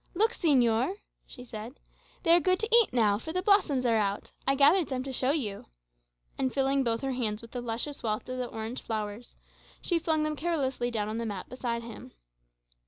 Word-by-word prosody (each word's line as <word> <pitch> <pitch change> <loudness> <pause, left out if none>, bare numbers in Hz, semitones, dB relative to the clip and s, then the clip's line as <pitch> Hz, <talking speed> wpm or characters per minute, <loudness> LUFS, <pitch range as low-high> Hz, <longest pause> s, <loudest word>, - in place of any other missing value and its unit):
"Look, 440 +5 +3
señor," 260 - +2 0.3
she 250 - -10
said, 230 +3 -8 0.4
"they 330 - +3
are - - +6
good 370 +3 +2
to 445 +1 +3
eat 470 -2 +5
now, 215 -4 +3
for 320 - -6
the 365 +2 -1
blossoms 370 -11 +3
are 230 -2 +3
out.[#] 200 -1 -1 0.2
I 275 - +4
gathered 300 +5 +5
some 260 -2 -2
to 270 0 -6
show 255 +1 +1
you;" 240 -10 -1 0.7
and 260 -1 +1
filling 270 0 +1
both 230 -2 0
her 270 - -1
hands 225 -4 -2
with 230 - -12
the 245 - -4
luscious 240 +5 -3
wealth 215 -1 -2
of 255 0 -4
the 250 - -2
orange 225 +2 -5
flowers, 215 +1 -5 0.4
she 345 -2 0
flung 315 -1 +1
them 305 0 -1
carelessly 280 -7 -1
down 215 -3 -2
on 220 +1 -3
the 230 - -2
mat 200 -3 -5
beside 235 -2 -3
him. 230 -1 -10
255 Hz, 205 wpm, -29 LUFS, 225-300 Hz, 0.7 s, are